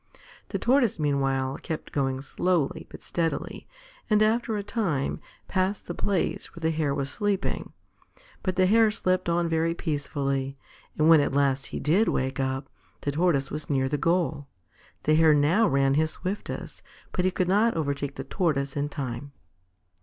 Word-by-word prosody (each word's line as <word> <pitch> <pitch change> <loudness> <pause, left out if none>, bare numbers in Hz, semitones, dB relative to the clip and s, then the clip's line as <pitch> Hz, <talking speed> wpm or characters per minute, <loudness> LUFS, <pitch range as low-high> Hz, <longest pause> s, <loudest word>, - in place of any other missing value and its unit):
The - - -1
Tortoise 250 -5 +2
meanwhile 135 -3 0
kept 160 -3 -5
going 135 -2 -1
slowly 170 0 -1
but - - -12
steadily, 165 -2 -3 0.4
and, 215 0 +5
after 225 0 +1
a 205 - -3
time, 195 - -1 0.3
passed 190 +1 -1
the - - -4
place 195 -4 -1
where 170 - -10
the 160 0 +1
Hare 150 -3 0
was 135 - -1
sleeping. 205 +1 -1 0.7
But 185 -3 -1
the 185 0 +4
Hare 220 +3 +5
slept 185 -4 0
on 170 0 +1
very 165 +1 +1
peacefully; 140 -4 -2 0.4
and 155 - +3
when 160 -2 +8
at 140 - -1
last 140 -1 +2
he - - -5
did 180 +10 +3
wake 130 +1 -1
up, 130 0 -1 0.3
the 145 - -1
Tortoise 145 -3 +1
was 150 +1 -5
near 135 -2 +1
the 145 +1 -1
goal. 165 -3 0 0.6
The 155 - +3
Hare 155 -1 +6
now 165 +10 +4
ran 135 0 +3
his 155 +2 +2
swiftest, 190 +5 -5 0.3
but 180 - 0
he 185 - +3
could 185 -1 -1
not 210 +2 +3
overtake 140 -2 -2
the - - -5
Tortoise 140 -7 -1
in 145 0 -1
time. 135 0 -5
155 Hz, 170 wpm, -26 LUFS, 140-185 Hz, 0.7 s, when